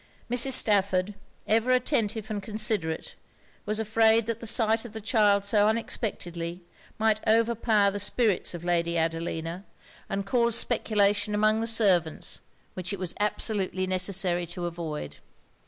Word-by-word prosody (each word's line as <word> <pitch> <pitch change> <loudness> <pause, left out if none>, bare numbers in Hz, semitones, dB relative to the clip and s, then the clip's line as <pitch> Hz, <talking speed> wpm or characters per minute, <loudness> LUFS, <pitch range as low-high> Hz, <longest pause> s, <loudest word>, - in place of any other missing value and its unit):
Mrs. 245 +2 +2
Stafford, 200 -3 +2 0.3
ever 225 +3 +1
attentive 230 -4 0
and 205 -1 -3
considerate, 210 -6 -2 0.5
was 215 +1 -1
afraid 220 +1 +3
that 230 0 -3
the 230 - -6
sight 225 0 +3
of 240 -3 -10
the 220 - -5
child 205 -2 +2
so 205 0 +3
unexpectedly, 180 -6 -3 0.3
might 220 -1 +1
overpower 220 -2 +2
the 205 - -4
spirits 205 -3 +1
of 170 - -8
Lady 170 -1 0
Adelina, 165 +2 -3 0.5
and 195 0 -3
cause 235 +1 +2
speculation 205 0 +1
among 215 +1 +2
the 230 - -1
servants 190 -8 +1 0.3
which 185 +2 -4
it 200 - -3
was 180 -1 -4
absolutely 205 -3 0
necessary 185 -1 0
to 175 +1 -6
avoid. 165 -3 -6
205 Hz, 140 wpm, -26 LUFS, 180-220 Hz, 0.5 s, afraid